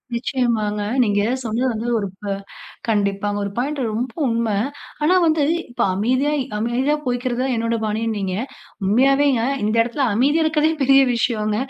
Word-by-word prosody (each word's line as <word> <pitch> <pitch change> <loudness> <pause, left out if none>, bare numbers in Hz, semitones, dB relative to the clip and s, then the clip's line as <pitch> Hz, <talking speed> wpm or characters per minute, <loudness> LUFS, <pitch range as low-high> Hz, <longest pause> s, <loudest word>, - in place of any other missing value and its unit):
நிச்சயமாங்க. 230 -4 -1 0.2
நீங்க 205 -2 +1 0.2
சொன்னது 235 +3 -1
வந்து, 225 +2 -4
ஒரு 200 - -2
ப - - -20 0.7
கண்டிப்பா 200 -1 0
ஒரு 200 - -2
பாயிண்ட் 280 +4 -1
ரொம்ப 235 +3 -3
உண்ம. 230 -1 0 0.5
ஆனா, 350 +5 +4
வந்து 315 -2 +2 0.3
இப்ப 240 - -4
அமைதியா! 255 +8 +1 0.3
அமைதியா 245 +6 +1
போயிக்கிறது 245 0 -1
தான் 265 -1 0
என்னோட 230 +1 0
பாணின்னீங்க. 210 -3 -2 0.5
உண்மையாவேங்க 270 +4 +3 0.2
இந்த 215 +2 0
இடத்தில 255 +4 -1
அமைதியா 285 +9 +2
இருக்கிறதே 315 0 +2
பெரிய 270 +1 +6
விஷயோங்க 215 -3 0
235 Hz, 140 wpm, -21 LUFS, 215-270 Hz, 0.7 s, பெரிய